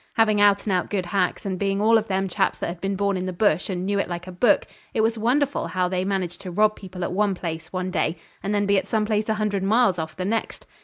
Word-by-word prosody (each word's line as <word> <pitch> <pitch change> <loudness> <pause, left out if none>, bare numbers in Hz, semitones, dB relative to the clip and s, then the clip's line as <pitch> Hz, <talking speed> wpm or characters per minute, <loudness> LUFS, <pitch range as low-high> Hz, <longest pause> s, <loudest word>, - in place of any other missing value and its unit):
Having 215 -2 +3
out 200 -1 +5
and 205 - -1
out 180 -1 0
good 195 -3 -1
hacks, 180 +1 -1
and 190 -2 -2
being 195 0 0
all 220 +2 +4
of 220 -1 +2
them 195 0 0
chaps 180 - 0
that - - -3
had 175 0 -7
been 195 0 -1
born 200 0 0
in 185 0 -3
the - - -2
bush 180 -1 +1
and 180 -1 -2
knew 200 +1 0
it 195 - -1
like 175 0 -5
a 185 - -8
book, 180 +7 +3 0.3
it 220 - +3
was 225 +1 +2
wonderful 260 +6 +1
how 185 -1 0
they 185 0 -1
managed 185 -3 -2
to 185 - -6
rob 210 +4 +2
people 185 -2 -8
at - - -2
one 200 0 +1
place 165 -1 -5
one 185 0 -3
day, 165 -2 0 0.2
and 200 - -3
then 205 -1 +1
be 200 -1 +3
at 190 - -8
some 215 0 +1
place 215 0 0
a 220 - +2
hundred 210 -2 -1
miles 200 -2 +3
off 160 0 -5
the 185 - -2
next. 225 +3 -2
195 Hz, 285 wpm, -24 LUFS, 180-210 Hz, 0.3 s, out